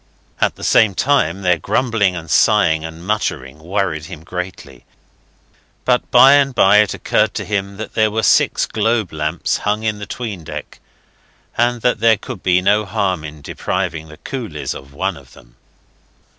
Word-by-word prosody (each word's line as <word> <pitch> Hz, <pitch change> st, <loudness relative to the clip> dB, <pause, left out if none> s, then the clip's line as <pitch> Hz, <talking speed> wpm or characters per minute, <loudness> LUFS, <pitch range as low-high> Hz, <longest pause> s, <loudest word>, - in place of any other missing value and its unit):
At -, -, +1 dB
the -, -, -12 dB
same 105 Hz, -4 st, +4 dB
time 100 Hz, -, +1 dB
their 90 Hz, -2 st, +2 dB
grumbling 115 Hz, -6 st, +1 dB
and 85 Hz, -2 st, -7 dB
sighing 80 Hz, -2 st, +3 dB
and 80 Hz, +1 st, -8 dB
muttering 75 Hz, -9 st, -2 dB
worried 85 Hz, -2 st, -2 dB
him 80 Hz, -1 st, -10 dB
greatly, 90 Hz, +2 st, -7 dB, 1.0 s
but 125 Hz, -1 st, +1 dB
by 130 Hz, +3 st, +7 dB
and 140 Hz, -2 st, +3 dB
by 100 Hz, +2 st, +5 dB
it 105 Hz, -2 st, +3 dB
occurred -, -, 0 dB
to -, -, -3 dB
him 100 Hz, -1 st, -3 dB
that 110 Hz, -, -7 dB
there 110 Hz, -1 st, +2 dB
were 110 Hz, +1 st, -2 dB
six -, -, +3 dB
globe 110 Hz, -3 st, -1 dB
lamps 75 Hz, +2 st, -1 dB
hung 105 Hz, +1 st, -2 dB
in 110 Hz, -2 st, -1 dB
the 105 Hz, -, -7 dB
'tween 105 Hz, -6 st, -6 dB
deck, -, -, -8 dB, 0.8 s
and 120 Hz, 0 st, +1 dB
that 125 Hz, -, +2 dB
there 115 Hz, -1 st, +4 dB
could 115 Hz, -2 st, -8 dB
be 90 Hz, 0 st, +2 dB
no 105 Hz, +2 st, +3 dB
harm 95 Hz, -4 st, -1 dB
in 75 Hz, -1 st, -9 dB
depriving 80 Hz, 0 st, -3 dB
the 75 Hz, 0 st, -13 dB
coolies 110 Hz, -, -5 dB
of 70 Hz, 0 st, -11 dB
one 95 Hz, +6 st, -2 dB
of 70 Hz, -4 st, -16 dB
them. -, -, -19 dB
95 Hz, 170 wpm, -18 LUFS, 80-110 Hz, 1.0 s, by